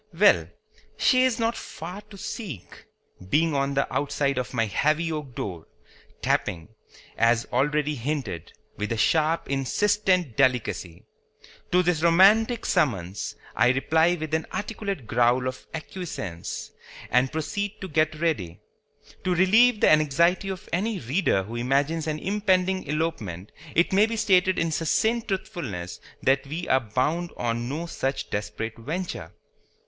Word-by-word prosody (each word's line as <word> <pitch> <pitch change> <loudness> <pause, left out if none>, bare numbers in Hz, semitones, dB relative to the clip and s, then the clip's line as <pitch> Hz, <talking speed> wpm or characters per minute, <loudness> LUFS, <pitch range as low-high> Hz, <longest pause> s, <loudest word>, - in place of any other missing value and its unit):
Well, - - +5 0.5
she 255 -1 +4
is 255 -3 +1
not 230 0 0
far 175 +7 -7
to 200 - -11
seek, 185 - -7 0.4
being 160 +6 +2
on 140 0 0
the 140 - +2
outside 140 -2 0
of 125 - -4
my 115 -3 +1
heavy 155 +9 +1
oak 150 -6 -5
door, 85 -5 -5 0.6
tapping, 85 0 0 0.5
as 115 0 +3
already 150 +3 +1
hinted, 135 - -4 0.3
with 105 +2 -3
a 115 - 0
sharp 160 +8 +2
insistent 180 - +1
delicacy. 115 -8 0 0.7
To 180 +1 +4
this 175 -3 +1
romantic 210 +8 +5
summons 100 - 0 0.2
I 120 +2 +4
reply 160 +6 +3
with 155 -2 -6
an 160 0 0
articulate 200 - -4
growl 120 +3 +2
of 130 - -6
acquiescence, 155 - -6 0.4
and 125 +1 +3
proceed 200 +6 -3
to 190 - -4
get 155 -1 +1
ready. 105 - -1 0.6
To 180 -1 +1
relieve 215 +6 +5
the - - +6
anxiety 160 +6 +3
of 190 -2 -6
any 205 +5 0
reader 130 - +1
who 115 +5 -6
imagines 140 +6 0
an 155 -1 -1
impending 190 0 +1
elopement 115 - -3 0.2
it 170 +3 +3
may 205 +3 +5
be 230 - -3
stated 185 -3 +3
in 165 -1 0
succinct 220 +9 +1
truthfulness 125 - -4 0.2
that 135 +1 +2
we 160 +5 -4
are 130 - +5
bound 130 +9 -1
on 120 0 -2
no 155 +5 -3
such 135 -5 -3
desperate 110 +2 -4
venture. 150 - -5
155 Hz, 140 wpm, -25 LUFS, 125-180 Hz, 0.7 s, the